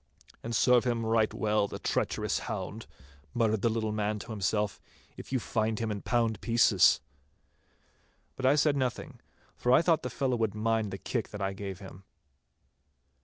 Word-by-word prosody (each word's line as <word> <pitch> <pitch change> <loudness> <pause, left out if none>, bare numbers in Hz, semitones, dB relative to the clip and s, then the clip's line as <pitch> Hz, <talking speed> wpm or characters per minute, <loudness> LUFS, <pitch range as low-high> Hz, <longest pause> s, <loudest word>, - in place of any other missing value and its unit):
'And 115 0 -4
serve 125 +1 +4
him 120 -2 -1
right 110 -1 +2
well, 105 -1 +1
the - - -7
treacherous - - -1
hound,' - - -5 0.5
muttered 110 -3 +1
the 115 - +2
little 110 -1 -1
man 105 0 -1
to 105 - -8
himself, 105 0 -1 0.3
'if - - -11
you 130 - +1
find 110 -1 -1
him 115 -1 -2
in 100 -1 -4
pound 115 -3 0
pieces!' 115 -8 +4 1.3
But 130 - 0
I 140 - +5
said 150 0 +3
nothing, 130 -3 -3 0.4
for 125 - 0
I 130 - +6
thought 165 -2 +3
the 125 - -4
fellow 130 -1 -1
would 110 -2 -1
mind 110 0 0
the 95 - -5
kick 115 +2 -3
that 105 - -7
I 95 0 -1
gave 95 -1 -6
him. 95 0 -12
110 Hz, 170 wpm, -29 LUFS, 105-120 Hz, 1.3 s, I